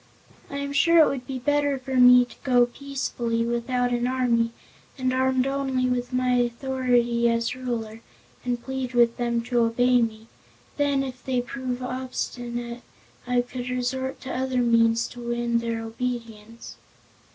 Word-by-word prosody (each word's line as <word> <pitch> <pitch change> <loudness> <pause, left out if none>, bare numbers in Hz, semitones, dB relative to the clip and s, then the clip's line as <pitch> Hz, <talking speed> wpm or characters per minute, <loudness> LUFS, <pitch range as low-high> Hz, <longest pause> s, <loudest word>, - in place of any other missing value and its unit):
I 280 - -5
am 280 0 -3
sure 335 +4 +4
it - - +3
would 255 -2 -5
be 265 -2 -4
better 290 +2 +1
for 265 0 -7
me 250 0 +7
to - - -15
go 245 -2 +4
peacefully, 240 -3 -3
without 245 +1 0
an 240 0 0
army 245 -3 +1 0.5
and 255 -1 0
armed 260 0 +2
only 270 -2 0
with 245 0 -1
my 255 0 +1
authority 240 -1 +1
as 230 +1 0
Ruler, 230 -3 -4 0.4
and 245 -1 -1
plead 265 -2 -4
with 235 -1 +4
them 235 -1 0
to 245 0 0
obey 245 +2 +3
me. 220 -1 -3 0.5
Then, 285 -2 +2
if 255 -1 -7
they 255 -2 0
prove 250 0 -4
obstinate 245 -2 -4 0.5
I 250 0 +2
could 245 0 -6
resort 260 +1 -2
to 260 - -5
other 255 -1 0
means 230 -1 +3
to 245 - -11
win 235 0 0
their 230 -1 -3
obedience." 230 -1 -6
245 Hz, 155 wpm, -25 LUFS, 235-260 Hz, 0.5 s, me